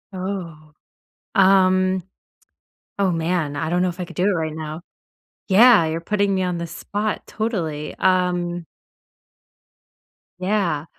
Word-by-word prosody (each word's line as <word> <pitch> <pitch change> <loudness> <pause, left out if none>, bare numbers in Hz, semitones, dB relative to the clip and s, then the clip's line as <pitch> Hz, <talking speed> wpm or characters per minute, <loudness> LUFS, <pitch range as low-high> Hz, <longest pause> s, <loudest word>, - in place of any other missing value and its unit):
Oh. 175 -5 -6 0.6
Um. 185 -1 +4 1.0
Oh, 195 -2 +2
man, 165 -3 -1
I 155 +2 -2
don't 175 +1 +1
know 180 - +2
if 175 +1 -8
I 180 - -3
could - - -13
do 180 - 0
it 205 - +3
right 160 -3 -2
now. 155 +1 -6 0.7
Yeah, 220 -1 +7
you're 160 +1 -2
putting 200 +2 0
me 190 - 0
on 180 -1 -1
the 170 - -4
spot, 205 +5 -4
totally, 165 -10 -3
um 180 -2 +1 1.7
Yeah. 185 -6 0
180 Hz, 130 wpm, -22 LUFS, 165-190 Hz, 1.7 s, Yeah